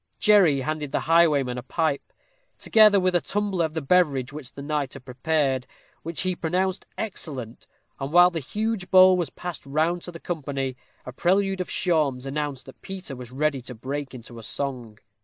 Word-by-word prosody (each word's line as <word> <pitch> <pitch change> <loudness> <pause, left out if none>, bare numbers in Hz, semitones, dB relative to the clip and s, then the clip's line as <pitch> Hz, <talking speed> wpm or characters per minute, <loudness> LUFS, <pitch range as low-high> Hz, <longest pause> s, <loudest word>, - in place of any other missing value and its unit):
Jerry 185 -10 +5
handed 150 0 -3
the - - 0
highwayman 150 -7 +3
a - - -6
pipe, 155 0 -2 0.5
together 215 -2 +5
with 185 0 +1
a 175 - +3
tumbler 200 -4 0
of 160 0 -6
the 160 - -2
beverage 140 -5 +2
which 145 -4 -7
the 140 - -9
knight 145 -2 -2
had 130 - -11
prepared, 135 0 0 0.3
which 165 0 -4
he 185 -1 -1
pronounced 185 +3 -1
excellent; 135 - -6 0.3
and 135 +1 -4
while 175 +2 +7
the 165 - -3
huge 210 +6 -3
bowl 185 0 +7
was 175 -5 -1
passed 175 +1 -7
round 160 +5 0
to 175 - -7
the 165 - -10
company, 140 -6 -3 0.3
a 125 - -6
prelude 190 +6 +1
of 180 - -5
shawms 150 -8 +1
announced 140 -1 -3
that 135 - -14
Peter 190 -7 -7
was 125 -2 -9
ready 140 +1 -1
to 125 +1 -9
break 135 +4 -5
into 120 -1 -10
song. 120 -3 -4
155 Hz, 180 wpm, -25 LUFS, 135-180 Hz, 0.5 s, while